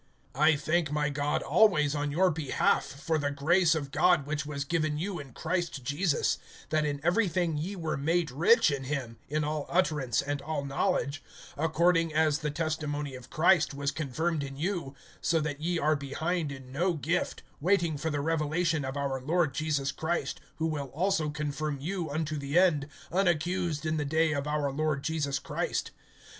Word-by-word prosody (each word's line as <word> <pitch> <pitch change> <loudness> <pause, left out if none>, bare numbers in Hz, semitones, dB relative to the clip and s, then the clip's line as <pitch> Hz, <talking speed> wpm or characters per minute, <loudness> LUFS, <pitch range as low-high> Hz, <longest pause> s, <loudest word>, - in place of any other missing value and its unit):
(4)I 150 +2 +4
thank 155 +1 +1
my 150 0 +1
God 145 +1 -1
always 155 -4 +4
on 145 -1 -1
your 180 +5 +3
behalf, 155 -3 +1
for 155 +3 -2
the 145 -1 0
grace 165 +4 +3
of 140 -3 -3
God 175 -1 +3
which 150 0 -3
was 140 -2 -3
given 155 -1 0
you 180 +2 -3
in 140 -3 -9
Christ 165 -1 -2
Jesus; 145 +5 +1 0.3
(5)that 155 -1 +2
in 145 -1 -2
everything 175 -2 +2
ye 170 +7 -3
were 160 -4 -2
made 160 +2 +1
rich 170 - +5
in 135 -2 -3
him, 130 -5 -4
in 150 +1 0
all 150 -1 -2
utterance 150 -8 +1
and 145 0 -2
all 155 -2 -3
knowledge; 140 +1 0 0.3
(6)according 165 +2 +2
as 155 -1 +3
the 150 - -2
testimony 150 -2 -2
of 125 -1 -10
Christ 155 -3 +3
was 140 0 -1
confirmed 155 +2 -1
in 135 -1 -6
you; 165 -4 -2 0.3
(7)so 160 -2 +2
that 150 -1 -4
ye 175 +2 0
are 155 0 +2
behind 155 +3 -2
in 135 -2 -9
no 175 +6 +1
gift, 165 +3 -1 0.2
waiting 170 -1 +2
for 160 +3 -2
the 145 -2 -1
revelation 160 +1 0
of 135 +1 -4
our 135 -2 -2
Lord 155 +1 +1
Jesus 145 -2 0
Christ; 160 -1 -2 0.2
(8)who 160 - +1
will 145 -3 -3
also 165 +3 0
confirm 150 0 -3
you 170 +2 -3
unto 155 +1 -2
the 140 +3 -1
end, 165 -6 +4 0.2
unaccused 175 -2 0
in 155 0 0
the 150 - -1
day 160 +2 +2
of 140 0 -2
our 150 -2 0
Lord 150 0 -1
Jesus 145 -3 -1
Christ. - - -2
155 Hz, 180 wpm, -29 LUFS, 145-165 Hz, 0.3 s, rich